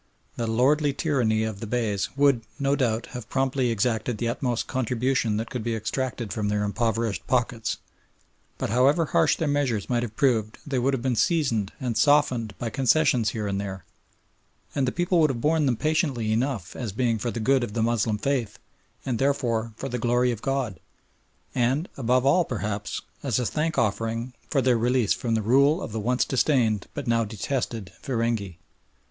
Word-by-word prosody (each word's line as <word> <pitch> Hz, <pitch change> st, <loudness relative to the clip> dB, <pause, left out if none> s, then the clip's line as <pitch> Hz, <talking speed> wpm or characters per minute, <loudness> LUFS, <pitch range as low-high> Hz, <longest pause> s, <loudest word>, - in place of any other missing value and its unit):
The 115 Hz, -, -2 dB
lordly 140 Hz, +6 st, +2 dB
tyranny 125 Hz, -7 st, +1 dB
of 110 Hz, -3 st, -4 dB
the 115 Hz, -, -5 dB
Beys 105 Hz, -4 st, -1 dB
would, 140 Hz, -4 st, +4 dB, 0.2 s
no 140 Hz, -1 st, +1 dB
doubt, 115 Hz, -4 st, 0 dB
have 125 Hz, -4 st, -7 dB
promptly 130 Hz, -1 st, +1 dB
exacted 115 Hz, +1 st, 0 dB
the 115 Hz, +2 st, -1 dB
utmost 120 Hz, -1 st, -1 dB
"contribution" 125 Hz, -2 st, 0 dB
that 115 Hz, +1 st, -4 dB
could 125 Hz, -3 st, -3 dB
be 115 Hz, 0 st, -1 dB
extracted 115 Hz, +1 st, -3 dB
from 105 Hz, -2 st, -1 dB
their 105 Hz, 0 st, 0 dB
impoverished 115 Hz, +1 st, -1 dB
pockets, 120 Hz, -3 st, 0 dB, 0.8 s
but -, -, -3 dB
however 140 Hz, +7 st, +4 dB
harsh -, -, +3 dB
their 160 Hz, -, -2 dB
measures 135 Hz, -7 st, 0 dB
might 120 Hz, -1 st, +2 dB
have 115 Hz, -3 st, -5 dB
proved 110 Hz, -5 st, +1 dB
they 135 Hz, -3 st, -1 dB
would 135 Hz, +2 st, +2 dB
have 120 Hz, -, -5 dB
been 130 Hz, -2 st, +1 dB
seasoned 120 Hz, -, +1 dB
and 120 Hz, -5 st, -1 dB
softened 130 Hz, -7 st, +3 dB
by 115 Hz, -2 st, -4 dB
concessions 135 Hz, -4 st, +3 dB
here 105 Hz, 0 st, -3 dB
and 100 Hz, -1 st, -1 dB
there, 95 Hz, -3 st, -6 dB, 0.9 s
and 135 Hz, -2 st, 0 dB
the -, -, +1 dB
people 175 Hz, +2 st, +1 dB
would 155 Hz, -2 st, +5 dB
have 125 Hz, -3 st, -2 dB
borne 155 Hz, +2 st, +2 dB
them 125 Hz, -3 st, +1 dB
patiently 145 Hz, -8 st, 0 dB
enough 115 Hz, -5 st, -1 dB
as 115 Hz, -5 st, -4 dB
being 115 Hz, +1 st, 0 dB
for 120 Hz, -, -2 dB
the 115 Hz, -, -4 dB
good 130 Hz, +3 st, +2 dB
of 105 Hz, -, -4 dB
the 115 Hz, -1 st, 0 dB
Moslem 115 Hz, -2 st, +1 dB
faith 130 Hz, -2 st, -1 dB, 0.5 s
and 125 Hz, -4 st, -1 dB
therefore 120 Hz, -5 st, 0 dB
for 135 Hz, -, -5 dB
the 125 Hz, -2 st, -3 dB
glory 120 Hz, +1 st, +2 dB
of 115 Hz, -3 st, -5 dB
God 135 Hz, -, -2 dB, 0.7 s
and, 130 Hz, +7 st, +1 dB
above 125 Hz, 0 st, +1 dB
all 175 Hz, +6 st, +5 dB
perhaps, 105 Hz, -, -4 dB, 0.2 s
as 130 Hz, -6 st, 0 dB
a 125 Hz, -, 0 dB
thankoffering 115 Hz, -5 st, -1 dB, 0.2 s
for 135 Hz, -4 st, +1 dB
their 125 Hz, -2 st, +3 dB
release 120 Hz, -2 st, +2 dB
from 115 Hz, -2 st, -1 dB
the 110 Hz, -, 0 dB
rule 140 Hz, -, +4 dB
of 115 Hz, -, -6 dB
the 110 Hz, -, -3 dB
once 125 Hz, +4 st, +1 dB
disdained 120 Hz, -7 st, +1 dB
but -, -, -4 dB
now 115 Hz, -1 st, +2 dB
detested 110 Hz, -1 st, -3 dB
feringhee. 115 Hz, -7 st, -2 dB
120 Hz, 185 wpm, -25 LUFS, 110-135 Hz, 0.9 s, would